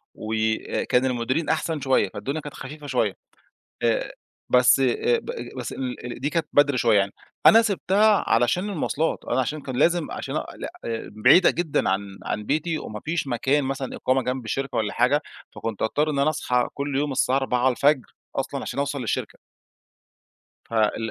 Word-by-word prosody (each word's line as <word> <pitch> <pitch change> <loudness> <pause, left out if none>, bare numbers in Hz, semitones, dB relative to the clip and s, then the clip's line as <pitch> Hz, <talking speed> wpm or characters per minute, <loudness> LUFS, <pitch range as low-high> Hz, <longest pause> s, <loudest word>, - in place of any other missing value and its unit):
وكان 110 +3 0
المديرين 130 +5 -1
أحسن 160 -1 -1
شوية، 130 -7 +2
فالدنيا 135 +9 -3
كانت 145 -1 -8
خفيفة 145 +2 -9
شوية. 120 -7 +1 0.7
آآ، 115 -1 +1 0.4
بس، 125 +1 +5
آآ، 460 - +2
ب 465 - -6 0.3
بس - - -4
ال 125 -1 -5
دي 145 +3 -1
كانت 165 -1 0
بدري 145 -2 +4
شوية 115 -4 +4
يعني. 100 0 0 0.3
أنا 225 +1 +9
سِبتها 205 0 +3
علشان 120 - +2
المواصلات، 160 -3 -1
أنا - - -1
علشان 145 +4 -1
كان 130 -2 -5
لازم 170 +2 +2
علشان - - -5
أ - - -2
ل - - -8 0.2
آآ 115 -1 -4
بعيدة 180 0 +7
جدًا 170 -4 0
عن 95 +1 -2
عن 105 - -3
بيتي، 155 +5 -1
وما 105 -6 -7
فيش 160 -1 -1
مكان 135 +3 +1
مثلًا 135 0 -3
إقامة 130 0 +1
جنب 125 -1 -3
الشركة 135 +4 -3
والّا 105 -2 -1
حاجة 145 +4 +2 0.3
فكنت 115 -3 -4
أضطر 150 +7 +1
إن 140 - -2
أنا 145 +3 +3
أصحى 125 -5 0
كل 140 -1 -3
يوم 145 0 0
الساعة 130 0 +2
04:00 130 +1 +2 0.3
أصلًا - - -2
علشان - - -5
أوصل 140 0 -1
للشركة. 115 - -3 1.3
فال 110 0 +1
135 Hz, 170 wpm, -24 LUFS, 120-150 Hz, 1.3 s, أنا